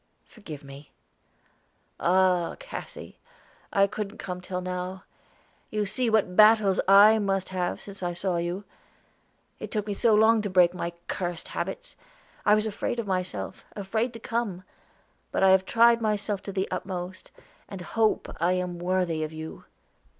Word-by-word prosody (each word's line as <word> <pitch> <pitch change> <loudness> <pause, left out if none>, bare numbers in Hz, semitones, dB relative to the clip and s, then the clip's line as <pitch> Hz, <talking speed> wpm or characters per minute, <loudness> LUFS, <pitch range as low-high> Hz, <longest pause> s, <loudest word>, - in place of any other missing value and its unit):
"Forgive 160 - -10
me." 140 +1 -12 1.1
"Ah, 180 -1 +2
Cassy! - - -9 0.5
I 200 -1 +4
couldn't 205 +1 -5
come 180 -3 -6
till 180 0 -4
now. 185 +1 -5 0.7
You 210 -1 -1
see 240 +4 0
what 210 -5 +1
battles 215 -2 +6
I 205 +3 +8
must 195 -2 -1
have 180 -2 -1
had - - -19
since 200 -1 -9
I 175 -1 -2
saw 175 0 -1
you. 175 +3 -3 1.0
It - - -6
took 210 -2 -2
me 210 - -2
so 220 +2 +3
long 220 +1 +5
to 205 - -3
break 180 -2 +4
my 170 -1 -4
cursed 175 -2 -3
habits. - - -5 0.5
I 210 - +7
was 215 0 +1
afraid 220 +2 -3
of 235 - -2
myself, 185 -2 -3
afraid 220 +4 -1
to 230 - -8
come; 225 -6 -3 0.7
but - - 0
I 190 - +7
have 190 0 +4
tried 235 +1 +4
myself 210 -2 -1
to 200 - -4
the 190 0 -1
utmost, 185 0 -5 0.4
and 195 -2 -7
hope 220 +4 0
I 175 +3 +2
am 180 -1 -3
worthy 175 -3 0
of 155 - -4
you. 160 0 -8
190 Hz, 160 wpm, -27 LUFS, 180-215 Hz, 1.1 s, I